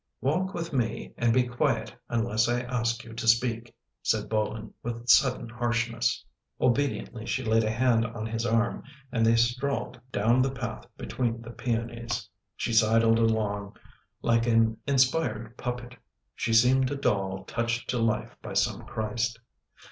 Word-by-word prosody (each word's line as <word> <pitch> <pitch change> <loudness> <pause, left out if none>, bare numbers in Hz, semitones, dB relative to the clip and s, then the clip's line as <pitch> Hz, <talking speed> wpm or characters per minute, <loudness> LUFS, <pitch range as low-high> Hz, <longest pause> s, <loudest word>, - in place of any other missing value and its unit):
"Walk 185 +8 0
with 170 -2 -4
me 120 -4 -1
and 115 -1 +2
be 125 +2 +4
quiet 120 0 -1
unless 115 0 +1
I 120 0 +1
ask 120 -1 -1
you 115 - -11
to 115 0 -4
speak," 115 0 +2 0.3
said 110 -1 0
Bolin 110 0 -2
with 120 0 -5
sudden 125 0 +4
harshness. 115 0 -1 0.3
Obediently 125 -3 0
she 130 - -1
laid 110 0 +3
a 110 - 0
hand 115 0 +2
on 115 -1 -6
his 115 0 -2
arm 115 0 +1 0.3
and 115 - +1
they 115 +1 +5
strolled 125 +2 0
down 115 +5 +3
the 135 - +2
path 120 -4 -5
between 115 -2 -2
the 115 - -8
peonies. 115 -1 -3 0.3
She 115 - -2
sidled 115 +1 +4
along 105 -3 0 0.5
like 115 0 +2
an 115 -1 +3
inspired 130 -4 +1
puppet 125 0 -5 0.2
— - - -52
she 115 - -2
seemed 125 +3 +5
a 145 - -2
doll 95 -7 -1
touched 115 +2 -2
to 125 - -1
life 115 -1 0
by - - -7
some - - +1
Christ. 115 +1 -2
115 Hz, 155 wpm, -28 LUFS, 115-125 Hz, 0.5 s, they